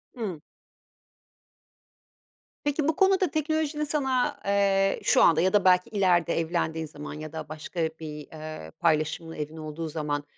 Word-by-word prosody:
Hı. 200 -10 -4 2.2
Peki, 290 +1 0
bu 320 - +2
konuda 380 0 +4
teknolojinin 310 -1 0
sana, 285 -1 0
eee, 195 -1 +2
şu - - +4
anda 165 -1 +5
ya 185 +2 +2
da 205 -3 +3
belki 180 -1 +5
ileride 180 -5 +2
evlendiğin 160 -1 -1
zaman 150 -1 -8
ya 155 0 -7
da 160 -1 -6
başka 155 +2 -4 0.2
bir, 150 -2 -7
eee, 155 - -8
paylaşımlı 160 0 0
evin 150 +1 -5
olduğu 155 +1 -5
zaman, 150 -2 -2
170 Hz, 140 wpm, -27 LUFS, 155-245 Hz, 2.2 s, anda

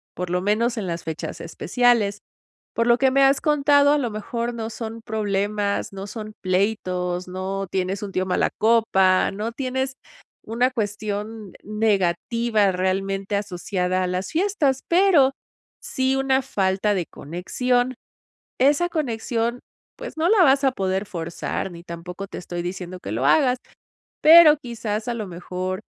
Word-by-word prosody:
por 180 -1 -4
lo 180 0 0
menos, 225 +5 +1
en 200 -4 -3
las 170 -1 -4
fechas 160 0 -5
especiales. 205 +5 +1 0.6
Por 230 0 +1
lo 240 0 +5
que 265 -1 +3
me 275 0 +4
has 270 0 +4
contado, 285 -1 +4
a 295 - +3
lo 245 -5 -1
mejor, 230 +3 -3
no 225 -1 -4
son 225 0 -6
problemas, 205 -1 -1
no 195 0 -6
son 215 0 -7
pleitos. 185 -2 -1
No 190 +2 -4
tienes 190 +1 -2
un 200 -2 -5
tío 185 0 -1
mala 185 - +1
copa. 210 -5 +3
No 215 +4 -4
tienes 265 +1 -2 0.5
una 240 +3 +1
cuestión 210 -2 -4
negativa, 210 +1 +1
realmente, 195 +2 -1
asociada 185 -2 -2
a - - 0
las 180 +1 -3
fiestas. 320 -7 +1
Pero 340 -7 +5 0.5
sí, 260 0 0
una 270 0 +2
falta 200 -4 0
de 180 -4 -2
conexión. 245 - -1 0.7
Esa 290 +6 +3
conexión, 235 -5 -2 0.4
pues, - - -8
no 325 +2 +2
la 420 -3 +6
vas 275 -2 +4
a 270 - +4
poder 190 -2 -1
forzar, 170 0 -4
ni 170 0 -11
tampoco 175 +3 -7
te - - -8
estoy 175 -1 -5
diciendo 180 0 -6
que 100 - -6
lo 120 +5 -1
hagas. 255 - +4 0.7
Pero 315 -1 +9
quizás, 225 -5 -4
a 240 - -1
lo 220 -3 -4
mejor, 185 +2 -4
210 Hz, 155 wpm, -23 LUFS, 185-250 Hz, 0.7 s, Pero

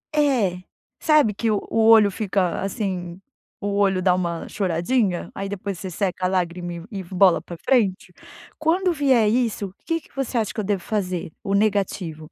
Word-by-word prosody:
É, 240 -12 +2 0.4
sabe 300 -9 +4
que 225 +2 0
o 210 - +2
o 225 - 0
olho 220 -3 +7
fica 195 -3 -1
assim, 185 -3 -3 0.4
o 205 - -4
olho 195 -2 +2
dá 180 -1 +3
uma 170 -2 -3
choradinha 185 +1 0
aí 195 0 -4
depois 200 -2 -4
você 190 - -5
seca 185 0 -2
a - - +2
lágrima 175 -1 -2
e 170 -1 -7 0.2
e - - -5
bola 185 0 +3
para 170 - -9
frente? 190 -6 +1 0.4
Quando 345 +3 +1
vier 265 -7 +3
isso 220 -5 -1
que 330 0 0
que - - -24
você 265 -2 -2
acha 220 -3 0
que - - -5
eu - - -1
devo 195 -2 -1
fazer? 185 -6 -2
O 195 - -2
negativo. 195 -6 0
195 Hz, 180 wpm, -23 LUFS, 180-225 Hz, 0.4 s, olho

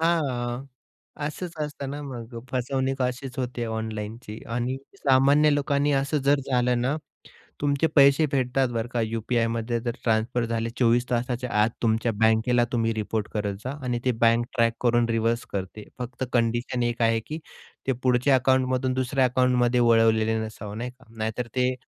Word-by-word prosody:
हां, 135 -6 0 0.6
असंच 170 +3 -5
असतं 145 -2 -4
ना, 145 - -5
मग. 120 -4 -8
अ, 115 - -5
फसवणूक 130 +1 -1
अशीच 125 +1 -3
होते 125 -2 -2
ऑनलाईनची. 110 0 -6 0.2
आणि 125 +2 -1 0.2
सामान्य 140 -1 +4
लोकांचं 145 0 +1
असं 140 +2 0
जर 140 0 +4
झालं 125 -1 +2
ना, 130 +5 0 0.6
तुमचे 145 +2 +2
पैसे 140 +2 +6
भेटतात, 130 -1 +1
बरं 115 -1 -3
का. 120 - 0
यू-पी-आयमध्ये 115 +1 -1
जर 120 +1 -3
ट्रान्सफर 115 +1 +1
झाले, 115 0 -2
24 120 0 +3
तासाच्या 125 0 -1
आत 110 - +2
तुमच्या 115 0 +1
बँकेला 110 +2 +3
तुम्ही 115 -2 +1
रिपोर्ट 110 0 -2
करत 105 -2 -2
जा, 130 - -2
आणि 125 -2 -1
ती 125 - +3
बँक 115 +1 +4
ट्रॅक 115 -1 +3
करून 120 -1 +3
रिव्हर्स 115 +1 0
करते. 100 +2 -5
फक्त 125 +1 -4
कंडिशन 120 +1 0
एक 120 0 -1
आहे, 115 0 +3
की 155 - -5 0.5
ते 135 - +2
पुढच्या 130 +2 +3
अकाउंटमधून 130 0 +2
दुसऱ्या 130 +1 +1
अकाउंटमध्ये 125 -1 +2
वळवलेले 110 -1 +4
नसावं. 105 -1 -7
नाही 125 +2 -4
का, 125 +1 -22
नाहीतर 110 +2 -2
ते 125 0 +2
125 Hz, 160 wpm, -25 LUFS, 115-130 Hz, 0.6 s, पैसे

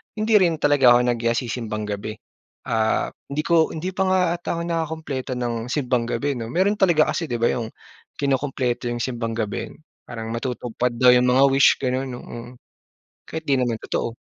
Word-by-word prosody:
hindi 215 0 +3
rin 175 -4 +3
talaga 140 -4 +5
ako 120 - +5
nag, 120 -1 0
ah, 115 - +3
si-Simbang 115 -3 -3
Gabi. 105 +1 -4 0.5
Ah, 110 -1 0 0.2
hindi 150 +3 -2
ko 165 -2 +3
hindi 180 +4 -4
pa 190 0 0
nga 185 0 +3
'ata 175 -1 -4
ako 170 - -2
nakakumpleto 160 -5 -3
ng 120 -1 -3
Simbang 125 -4 0
Gabi, 140 +5 -1
'no. 115 -3 -5
Meron 190 +8 +2
talaga 170 -5 +5
kasi 165 -5 -3
di 120 - -1
ba 115 - +1
yung 115 -2 -3 0.5
kinukumpleto 135 -3 -1
yung 120 - -2
Simbang 115 -3 -3
Gabi 105 -2 -3 0.4
parang 115 -2 -5
matutupad 125 0 -2
daw 125 0 +6
yung 125 0 +4
mga 130 +2 +5
wish 135 0 +5
ganun 130 0 -2
'no, 125 -1 -6
oo. 120 0 -8 0.8
Kahit 160 0 -5
di 145 - -1
naman 120 -2 0
totoo. 115 - -2
125 Hz, 185 wpm, -23 LUFS, 120-155 Hz, 0.8 s, daw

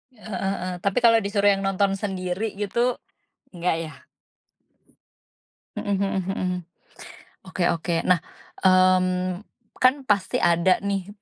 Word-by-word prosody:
Heeh 215 -3 -7
heeh, 185 -2 -2
tapi 200 +6 0
kalau 230 -1 +6
disuruh 205 -1 +2
yang 195 - 0
nonton 195 0 +1
sendiri 190 +1 -3
gitu, 235 +5 0 0.6
enggak 175 -1 0
ya? 155 - -9 1.9
Mhm 205 -1 -1
mhm 195 -1 -1
mhm. 180 -1 -1 0.9
Oke 185 -1 -2
oke. 165 0 -2
Nah, 180 -2 +3 0.4
mmm, 185 -1 +3 0.4
kan 265 +2 +4
pasti 205 -6 +1
ada 170 +2 +3
nih 195 -2 -2
190 Hz, 120 wpm, -24 LUFS, 180-205 Hz, 1.9 s, kalau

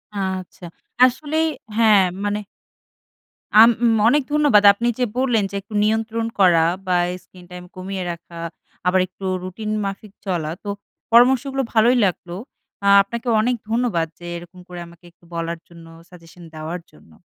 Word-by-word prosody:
আচ্ছা, 190 -2 -4 0.4
আসলেই 305 +5 0 0.3
হ্যাঁ 215 -4 +5 0.2
মানে 205 0 -1 1.2
আম 225 +2 +9 0.3
ম - - +2
অনেক 290 +1 +2
ধন্যবাদ। 290 -9 +4
আপনি 235 +4 -2
যে 250 - +2
বললেন 245 -5 +2
যে 200 - -7
একটু 210 +2 -15
নিয়ন্ত্রণ 225 +1 0
করা 175 -4 +5 0.2
বা 180 -1 +2 0.3
স্কিন 180 -1 -17
টাইম 180 0 -8
কমিয়ে 185 0 -5
রাখা, 170 0 -10 0.5
আবার 185 +1 +3
একটু 190 +1 -11 0.2
রুটিন 210 +4 -5
মাফিক 195 +1 -6
চলা। 170 -5 -2
তো 205 - -5 0.4
পরামর্শগুলো 265 +3 +4
ভালোই 235 +3 +4
লাগলো। 175 -1 -3 0.5
আ - - +3 0.2
আপনাকে 235 +5 -7
অনেক 245 +2 +1
ধন্যবাদ 225 -9 0
যে 175 - -11
এরকম 175 +2 -13
করে 180 -1 -9
আমাকে 170 +1 -18
একটু 175 - -27
বলার 165 0 -3
জন্য, 170 -1 -15 0.2
সাজেশন 170 0 -15
দেওয়ার 160 +3 -5
জন্য। - - -21
195 Hz, 150 wpm, -21 LUFS, 175-230 Hz, 1.2 s, আম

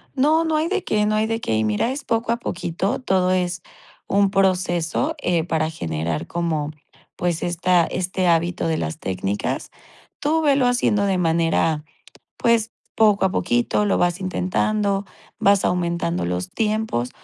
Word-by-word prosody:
No, 305 +4 +3
no 320 -1 +1
hay 315 +2 +1
de 385 +1 -1
qué, 210 -1 +1
no 215 0 +1
hay 215 +1 +1
de 225 0 -1
qué. 110 - 0
Mira, 110 - 0
es 280 +3 -5
poco 230 0 0
a 235 - +1
poquito, 185 -2 -2
todo 190 -7 +1
es 180 -1 0 0.5
un 200 0 +2
proceso, 185 - +1
eh, 170 -2 +1
para 160 -1 0
generar 80 - -3
como 160 -3 -2 0.4
pues 175 -2 -1
esta 175 0 +2
este 185 0 -2
hábito 170 0 +1
de 160 -1 0
las 80 - -3
técnicas, 95 +2 -3 0.5
tú 310 +2 +1
velo 280 -4 +3
haciendo 225 -4 +2
de 195 -2 +1
manera 165 -2 +1 0.5
pues 230 -1 +2 0.2
poco 210 -3 +4
a 190 - +1
poquito, 120 - +1
lo 205 - +2
vas 175 0 +1
intentando, 195 +2 0 0.3
vas 200 0 +4
aumentando 170 - -1
los 90 +1 -3
tiempos 215 - -1
185 Hz, 155 wpm, -22 LUFS, 165-215 Hz, 0.5 s, poco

